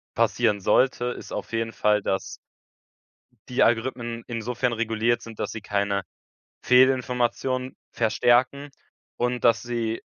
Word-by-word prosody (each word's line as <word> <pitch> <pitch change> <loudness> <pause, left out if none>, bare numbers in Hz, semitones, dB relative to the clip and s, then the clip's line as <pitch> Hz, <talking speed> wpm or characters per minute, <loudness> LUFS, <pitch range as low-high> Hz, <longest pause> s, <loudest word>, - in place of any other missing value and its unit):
passieren 105 - +2
sollte, 125 +4 +2
ist 125 - -5
auf - - -5
jeden 115 0 -1
Fall, 105 +1 +2
dass 95 - -2 1.1
die 125 - +1
Algorithmen 120 0 0
insofern 120 +1 -2
reguliert 115 +1 0
sind, 115 -2 -11
dass - - -3
sie 110 - -6
keine 100 -1 -1 0.6
Fehlinformationen 125 0 +2 0.2
verstärken 120 +5 +2 0.5
und 125 0 -1
dass 115 -1 +4
sie 115 -2 -3
120 Hz, 120 wpm, -25 LUFS, 110-125 Hz, 1.1 s, dass